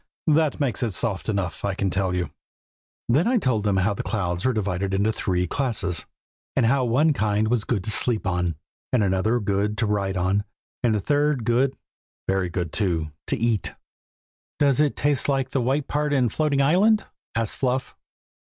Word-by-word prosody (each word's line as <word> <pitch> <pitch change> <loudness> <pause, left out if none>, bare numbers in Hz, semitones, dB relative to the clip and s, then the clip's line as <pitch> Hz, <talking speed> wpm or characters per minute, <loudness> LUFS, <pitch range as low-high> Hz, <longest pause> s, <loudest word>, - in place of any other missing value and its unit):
"That 155 -1 +2
makes 135 -4 -1
it 115 -5 -1
soft 100 -6 -1
enough, 100 -4 -2
I 100 -1 -1
can 95 -1 -1
tell 95 0 0
you." 90 -1 -2 0.8
Then 145 - +3
I 250 +1 +3
told 130 - +1
them 100 -2 +1
how 100 +2 +2
the - - -4
clouds 90 -5 -2
were - - +3
divided 100 -3 -1
into 105 +3 +1
three 90 -4 0
classes, 110 - -1 0.5
and 130 - +3
how 130 +2 +3
one 145 +7 +3
kind 110 -2 +1
was 115 -3 +1
good 105 -7 -1
to 110 - -3
sleep 115 -1 0
on, 90 -3 0 0.4
and 125 -4 +3
another 100 +5 +1
good 105 0 -1
to 115 - +1
ride 100 -2 -1
on, 95 +3 +1 0.4
and 115 -3 +2
the 105 - 0
third 145 -1 +1
good 125 +3 +2 0.5
(very 95 -2 +1
good, 85 -2 -3
too,) 85 -7 -1 0.2
to 140 - +1
eat. 115 -3 0 0.8
"Does 140 -2 +3
it 150 -2 +2
taste 145 -1 +1
like 135 -2 0
the 135 - +1
white 135 +4 0
part 150 0 0
in 125 -4 +3
floating 140 +2 +1
island?" 205 +9 +4 0.3
asked 115 -2 -1
Fluff. 130 0 -1
110 Hz, 185 wpm, -24 LUFS, 95-135 Hz, 0.8 s, island